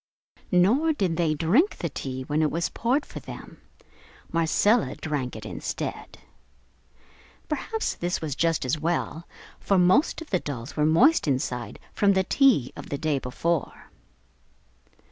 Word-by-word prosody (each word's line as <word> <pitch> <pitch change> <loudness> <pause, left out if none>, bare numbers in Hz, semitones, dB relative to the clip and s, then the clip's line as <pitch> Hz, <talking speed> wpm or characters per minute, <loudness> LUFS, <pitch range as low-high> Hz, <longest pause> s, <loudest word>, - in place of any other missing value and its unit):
Nor 235 - +4
did 190 - -1
they 160 -3 +1
drink 215 - +2
the 170 - -2
tea 130 -2 -5
when 150 +4 0
it 155 - +2
was 170 +2 -1
poured 255 +5 0
for - - -8
them. - - -11 0.7
Marcella 185 +8 +2
drank 145 -5 -3
it - - -8
instead. - - -5 1.3
Perhaps 445 0 -2
this 175 +1 -2
was 155 -3 -3
just 165 -3 +1
as 130 +5 0
well, 165 +1 -2 0.3
for, 195 - +1
most 185 - +3
of 325 - -10
the 185 - +2
dolls 130 -4 -6
were 150 0 +2
moist 240 - +4
inside 130 -3 -2 0.2
from 200 -1 +3
the 190 0 +2
"tea" 235 - +3
of - - -9
the 140 - -2
day 150 -2 0
before. 150 +6 -3
165 Hz, 145 wpm, -26 LUFS, 150-205 Hz, 1.3 s, Nor